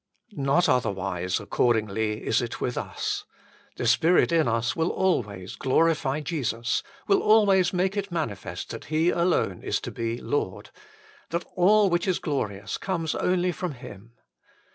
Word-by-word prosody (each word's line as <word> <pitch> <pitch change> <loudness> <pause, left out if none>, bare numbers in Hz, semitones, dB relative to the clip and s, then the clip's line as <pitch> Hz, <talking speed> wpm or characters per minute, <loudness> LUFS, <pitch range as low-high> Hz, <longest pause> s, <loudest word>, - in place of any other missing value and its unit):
Not 140 +3 +2
otherwise, 95 -6 0
accordingly, 110 -2 0
is 115 - +2
it 120 - -5
with 125 - -2
us. - - -3 0.5
The - - -2
Spirit 160 +11 +4
in 165 -4 +3
us 115 +1 0
will 165 +1 +1
always 105 - -1
glorify 150 0 +1
Jesus, 130 -6 -1 0.3
will 395 -1 +4
always 200 -4 +4
make 185 +2 0
it 200 -2 -3
manifest 100 - -4
that - - -7
He 160 +3 +2
alone 175 +1 +1
is - - -1
to - - -6
be 115 0 -3
Lord, 95 -10 -3 0.6
that 170 +2 -2
all 205 +3 +5
which 175 +3 +1
is 185 - +2
glorious 100 - -3
comes 165 -5 -2
only 180 0 +1
from 175 -1 -4
Him. 115 -3 -12
145 Hz, 145 wpm, -26 LUFS, 115-175 Hz, 0.6 s, all